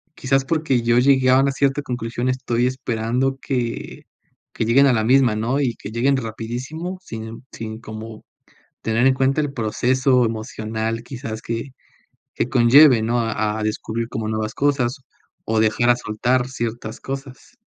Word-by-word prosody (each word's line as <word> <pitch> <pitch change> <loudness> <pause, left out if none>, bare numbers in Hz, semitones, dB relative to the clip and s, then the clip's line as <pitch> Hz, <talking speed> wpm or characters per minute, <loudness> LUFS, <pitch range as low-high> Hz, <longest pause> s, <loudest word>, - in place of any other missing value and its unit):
quizás, 135 0 +1
porque 155 -5 +1
yo 120 +1 +4
llegué 130 0 +4
a 130 +1 +6
una 135 0 +3
cierta 135 +1 +1
conclusión, 120 -1 -3
estoy 125 -1 0
esperando 125 +1 -1
que 120 -3 -3 0.5
que - - -1
lleguen 135 +5 +5
a 130 - +4
la 110 -2 +1
misma, 125 -1 +4
¿no? 120 +6 0
Y 125 -4 0
que - - -9
lleguen 125 +5 +2
rapidísimo 130 +10 -5
sin 115 -6 -8
sin 110 -1 -7
como 110 0 -9 0.6
tener 115 +2 +1
en 135 - +4
cuenta 135 +3 +2
el 145 -2 -2
proceso 125 +2 +2
emocional, 110 0 -3
quizás 115 -3 -6
que 115 +3 -5 0.6
que 120 - -1
conlleve, 125 +1 +6
¿no? 120 +2 +1
A 110 -1 -1
a - - -2
descubrir 115 +2 -3
como 110 -2 -4
nuevas 110 0 -2
cosas, 140 -2 0 0.4
o 110 0 +1
dejar 110 +2 +3
a 120 - +5
soltar 125 +3 0
ciertas 115 -2 -5
cosas. 135 - -8
120 Hz, 160 wpm, -21 LUFS, 110-135 Hz, 0.6 s, a